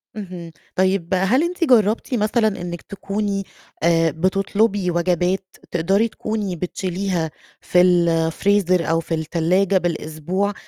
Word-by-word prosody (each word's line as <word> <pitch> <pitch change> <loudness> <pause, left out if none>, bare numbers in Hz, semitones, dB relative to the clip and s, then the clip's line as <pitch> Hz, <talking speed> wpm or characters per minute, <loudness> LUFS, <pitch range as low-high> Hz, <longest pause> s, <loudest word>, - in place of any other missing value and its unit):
اهم. 180 -5 -7 0.2
طيب 185 -1 +1
هل 195 - +3
أنتِ 350 0 -2
جربتِ 230 -4 +3
مثلًا 220 0 +2
إنكِ 175 -1 -5
تكوني 200 0 -3 0.4
آآ 165 -1 +3
بتطلبي 195 +3 +1
وجبات 180 +2 0 0.2
تقدري 195 +6 +2
تكوني 215 -4 -3
بتشيليها 180 -1 -2 0.3
في 180 - +3
الfreezer 175 +2 +2
أو 165 0 +2
في 165 0 -3
التلاجة 175 +5 +1
بالأسبوع، 175 +3 -2
185 Hz, 110 wpm, -21 LUFS, 170-200 Hz, 0.4 s, هل